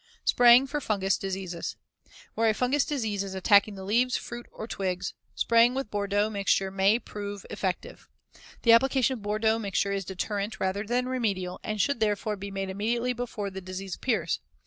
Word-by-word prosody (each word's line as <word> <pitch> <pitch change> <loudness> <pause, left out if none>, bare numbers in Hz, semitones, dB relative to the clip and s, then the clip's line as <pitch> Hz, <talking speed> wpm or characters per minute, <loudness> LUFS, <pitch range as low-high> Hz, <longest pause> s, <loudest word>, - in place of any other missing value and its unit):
Spraying 245 +2 +7
for 290 +2 -3
fungous 195 -5 +1
diseases: 185 -3 -4 0.6
Where 225 0 +2
a 215 - +1
fungous 260 +5 +1
disease 220 -9 -1
is 195 -1 -6
attacking 200 +2 +4
the 190 - -8
leaves, 240 +6 +2
fruit, 240 0 -8
or 220 - -7
twigs, 185 -3 -3 0.2
spraying 235 +2 +4
with 265 -5 -3
Bordeaux 205 0 +1
mixture 195 -2 +1
may 195 +3 +3
prove 205 -4 -7
effective. 190 -4 -4 0.5
The 235 - +6
application 265 +2 +4
of - - -14
Bordeaux 215 +2 +1
mixture 200 -1 -1
is 195 0 -1
deterrent 200 +3 -3
rather 190 +2 -1
than 250 +2 0
remedial, 200 -8 -2
and 215 0 -3
should 280 +3 +1
therefore 210 0 0
be 200 0 -7
made 195 -1 -4
immediately 235 +5 -1
before 225 -4 -4
the 190 0 -7
disease 185 0 -6
appears. 205 -11 -1
205 Hz, 170 wpm, -27 LUFS, 195-235 Hz, 0.6 s, Spraying